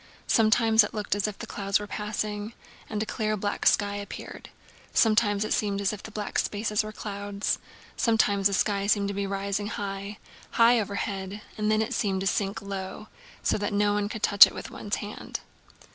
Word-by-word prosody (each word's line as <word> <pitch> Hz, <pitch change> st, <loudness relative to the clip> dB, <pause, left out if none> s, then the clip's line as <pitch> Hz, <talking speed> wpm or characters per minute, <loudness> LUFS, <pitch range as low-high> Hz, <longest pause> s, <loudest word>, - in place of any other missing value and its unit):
Sometimes 225 Hz, 0 st, +5 dB
it 210 Hz, -, -5 dB
looked 210 Hz, -1 st, -1 dB
as 205 Hz, 0 st, 0 dB
if 210 Hz, -, -6 dB
the -, -, -6 dB
clouds 200 Hz, 0 st, 0 dB
were 210 Hz, -, -5 dB
passing, 210 Hz, +1 st, -4 dB, 0.4 s
and 215 Hz, -1 st, -1 dB
a -, -, -4 dB
clear 215 Hz, -1 st, -1 dB
black 205 Hz, +1 st, -1 dB
sky 205 Hz, -1 st, +3 dB
appeared. 200 Hz, 0 st, -8 dB, 0.5 s
Sometimes 215 Hz, -2 st, +3 dB
it -, -, 0 dB
seemed 200 Hz, -2 st, 0 dB
as 200 Hz, +1 st, 0 dB
if 210 Hz, -, -7 dB
the -, -, -9 dB
black 210 Hz, -1 st, -3 dB
spaces 210 Hz, 0 st, 0 dB
were 215 Hz, -, -6 dB
clouds. 205 Hz, -1 st, -3 dB, 0.4 s
Sometimes 205 Hz, -4 st, +3 dB
the 200 Hz, -, -3 dB
sky 200 Hz, 0 st, +1 dB
seemed 205 Hz, -1 st, +2 dB
to -, -, -3 dB
be 200 Hz, 0 st, -2 dB
rising 200 Hz, +1 st, -2 dB
high, 200 Hz, -1 st, -5 dB, 0.4 s
high 235 Hz, +1 st, +6 dB
overhead, 200 Hz, -1 st, -3 dB
and 215 Hz, -1 st, 0 dB
then 215 Hz, 0 st, +3 dB
it 220 Hz, -, -4 dB
seemed 195 Hz, -3 st, 0 dB
to -, -, -2 dB
sink 195 Hz, +1 st, 0 dB
so -, -, -13 dB
low 195 Hz, +1 st, -6 dB, 0.4 s
that 205 Hz, 0 st, 0 dB
one 205 Hz, 0 st, +1 dB
could 220 Hz, -, -6 dB
touch 200 Hz, -, +9 dB
it -, -, -9 dB
with -, -, -7 dB
one's 205 Hz, -, -3 dB
hand. 210 Hz, 0 st, -6 dB
205 Hz, 190 wpm, -27 LUFS, 200-215 Hz, 0.5 s, touch